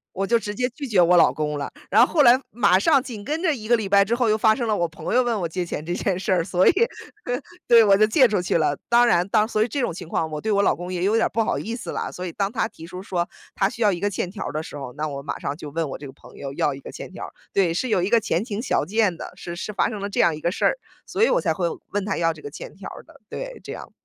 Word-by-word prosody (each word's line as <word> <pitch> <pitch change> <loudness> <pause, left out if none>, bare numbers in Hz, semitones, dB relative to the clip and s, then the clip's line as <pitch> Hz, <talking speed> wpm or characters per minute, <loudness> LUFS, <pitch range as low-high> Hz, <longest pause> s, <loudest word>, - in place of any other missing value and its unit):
我 195 +1 -1
就 235 +3 +3
直 210 -2 -5
接 250 +3 0
拒 280 +3 -7
绝 205 -6 +3
我 175 +1 +5
老 - - +6
公 150 -1 -2
了， 140 - -4 0.2
然 225 +4 +6
后 - - -5
后 310 - +5
来 250 0 +6
马 205 -5 +3
上 275 +6 +4
紧 220 -6 -8
跟 310 +2 -2
着 320 -5 +2
1 215 -3 -8
个 240 - +5
礼 215 -3 -3
拜 200 0 +5
之 225 - 0
后 240 -1 +1
又 215 - +3
发 220 0 +4
生 240 -3 -2
了 215 - +1
我 170 -2 0
朋 160 - -5
友 255 - +5
问 235 -4 -1
我 170 - -1
借 180 +2 -3
钱 155 -3 -5
这 175 - -2
件 185 -1 -1
事 195 - -1
儿， 175 -3 +2
所 180 +2 +2
以 - - +7 1.0
对 230 -1 +8
我 200 -2 +5
就 215 +2 +5
借 260 +4 +5
出 205 -6 0
去 175 - +1
了。 150 -2 +1
当 240 0 +5
然 175 -5 +3
当 215 +1 +3
所 215 -1 0
以 235 - +1
这 275 +5 -3
种 240 - 0
情 175 -2 -8
况 160 -1 -1
我 150 - -4
对 220 - -2
我 200 -1 +3
老 - - +3
公 180 +1 -7
也 180 0 -2
有 205 - +2
点 225 - +3
儿 - - 0
不 225 +2 0
好 - - -1
意 230 +2 -4
思 240 - -6
了， - - -3
所 180 - -6
以 170 - -5
当 195 +3 -1
他 230 - -1
提 165 - -12
出 180 +1 -8
说 180 -3 -2 0.3
他 195 - +2
需 230 - -6
要 205 -2 +4
一 175 - -4
个 205 +1 0
欠 180 -2 -3
条 200 - -6
儿 - - -4
的 155 +1 -2
时 150 - -9
候， 135 -3 -7
那 155 +1 -3
我 140 -2 -5
马 140 - -5
上 140 - -4
就 150 - -8
问 160 +1 -2
我 - - -5
这 145 - -9
个 135 - -9
朋 - - -17
友 135 -1 -6
要 145 - 0
一 135 - -10
个 - - -9
欠 - - -9
条 - - -7
儿。 - - -14 0.2
对， 185 -4 +2
是 220 +10 -1
有 190 -6 +2
一 190 - -1
个 235 - +5
前 180 -2 -1
情 220 -3 -4
小 - - 0
件 200 0 +1
的。 - - -7
是 170 - -7
是 200 +4 -5
发 - - +1
生 215 -3 -5
了 200 +1 -4
这 - - -1
样 165 - +4
一 - - -9
个 170 - 0
事 - - -3
儿， - - +3 0.3
所 - - -2
以 465 - +6
我 - - +2
才 - - 0
会 - - -1 0.3
问 205 -1 -1
他 200 - -2
要 165 -1 +1
这 - - -14
个 430 - -7
欠 - - -9
条 - - -9
儿 - - -10
的， - - -19
对， - - -7
这 - - -7
样。 - - -9
200 Hz, 360 characters per minute, -23 LUFS, 170-230 Hz, 1.0 s, 对